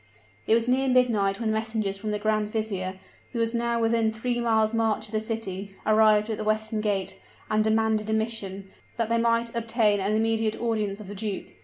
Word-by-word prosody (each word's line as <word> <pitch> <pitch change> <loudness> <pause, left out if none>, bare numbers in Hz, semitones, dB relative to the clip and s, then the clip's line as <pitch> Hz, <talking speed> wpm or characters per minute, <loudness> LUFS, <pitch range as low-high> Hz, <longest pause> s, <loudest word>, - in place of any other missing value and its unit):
It 225 - +5
was 230 0 +1
near 260 +2 +2
midnight 230 -6 +2
when 225 -2 0
messengers 220 -2 -1
from 210 +2 -5
the 210 - 0
grand 215 0 0
vizier, 200 -4 -2 0.4
who 235 - -2
was 230 0 +1
now 235 0 0
within 225 -1 +2
three 240 +2 -2
miles' 220 -1 +2
march 225 -1 +1
of 215 - -6
the 215 -1 0
city, 200 -3 -5
arrived 215 -1 +4
at 215 - -3
the - - -2
western 215 0 -1
gate, 195 -2 -2 0.3
and 215 0 +3
demanded 220 0 +1
admission, 220 -3 -2 0.3
that 230 -1 0
they 230 0 +2
might 230 0 +1
obtain 225 -3 +2
an 195 +2 0
immediate 225 0 +1
audience 215 -3 -1
of 210 - -9
the 205 - -7
duke. 205 -1 -4
220 Hz, 195 wpm, -26 LUFS, 210-230 Hz, 0.4 s, It